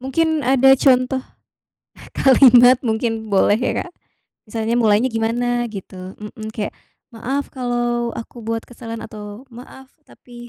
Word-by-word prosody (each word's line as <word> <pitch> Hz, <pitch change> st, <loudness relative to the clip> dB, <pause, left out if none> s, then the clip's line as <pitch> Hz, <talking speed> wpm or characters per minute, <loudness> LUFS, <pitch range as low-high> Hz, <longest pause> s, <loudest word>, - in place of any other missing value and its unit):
Mungkin 315 Hz, +4 st, 0 dB
ada 270 Hz, 0 st, +5 dB
contoh 255 Hz, -1 st, +2 dB, 0.9 s
kalimat 255 Hz, -2 st, +6 dB
mungkin 225 Hz, -1 st, -2 dB
boleh 205 Hz, +2 st, +3 dB
ya 255 Hz, -, -1 dB
Kak. 355 Hz, -, -14 dB, 0.6 s
Misalnya, 225 Hz, +1 st, -2 dB
mulanya 220 Hz, +1 st, +3 dB
gimana, 240 Hz, +2 st, -1 dB
gitu, 190 Hz, -2 st, -9 dB
mhm, 215 Hz, +1 st, -8 dB
kayak, 210 Hz, -, -4 dB, 0.4 s
"Maaf 270 Hz, +5 st, -3 dB
kalau 240 Hz, -1 st, -2 dB
aku 230 Hz, +1 st, -9 dB
buat 225 Hz, 0 st, -3 dB
kesalahan." 230 Hz, -1 st, -8 dB
atau 210 Hz, +3 st, -10 dB
"Maaf 260 Hz, +2 st, -13 dB, 0.2 s
tapi" 240 Hz, -1 st, -14 dB
240 Hz, 125 wpm, -19 LUFS, 225-255 Hz, 0.9 s, kalimat